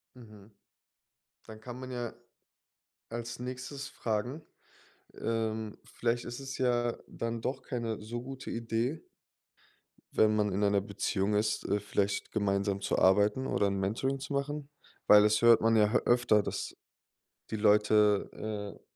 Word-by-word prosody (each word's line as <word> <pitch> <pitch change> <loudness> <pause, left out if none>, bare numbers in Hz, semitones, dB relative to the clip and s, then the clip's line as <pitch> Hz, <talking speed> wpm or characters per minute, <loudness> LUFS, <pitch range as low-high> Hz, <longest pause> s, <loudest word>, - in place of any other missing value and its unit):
Mhm. 110 -4 -14 1.0
Dann 110 -1 -11
kann 125 +2 -8
man 130 0 -7
ja 120 -2 -4 1.0
als 120 +1 -5
Nächstes 130 +2 -6
fragen 120 +5 -3 0.7
ähm, 110 -1 -2
vielleicht 120 0 -2
ist 120 +1 -6
es 135 0 -6
ja 120 -2 +1
dann 115 0 -4
doch 130 +2 -3
keine 115 -4 -3
so 120 +3 -5
gute 130 +1 -8
Idee, 115 +6 -2 1.1
wenn 110 0 +3
man 105 -1 +1
in 100 +2 +1
einer 100 0 +3
Beziehung 100 0 -1
ist, 105 +1 0
äh, 100 +1 +1
vielleicht 100 0 -1
gemeinsam 100 -1 0
zu - - -1
arbeiten 105 +7 +4
oder 100 - +1
'n 100 0 -1
Mentoring 115 +8 -1
zu 140 +2 -6
machen? 145 +1 -3 0.4
Weil 105 0 +8
das 105 +1 +3
hört 120 -1 +7
man 115 0 +3
ja 105 -1 +4
h 125 - +5
öfter, 120 -3 +4
dass - - -4 0.8
die 110 - 0
Leute, 105 -1 +4
äh, 105 -2 -6
110 Hz, 145 wpm, -31 LUFS, 105-125 Hz, 1.1 s, Weil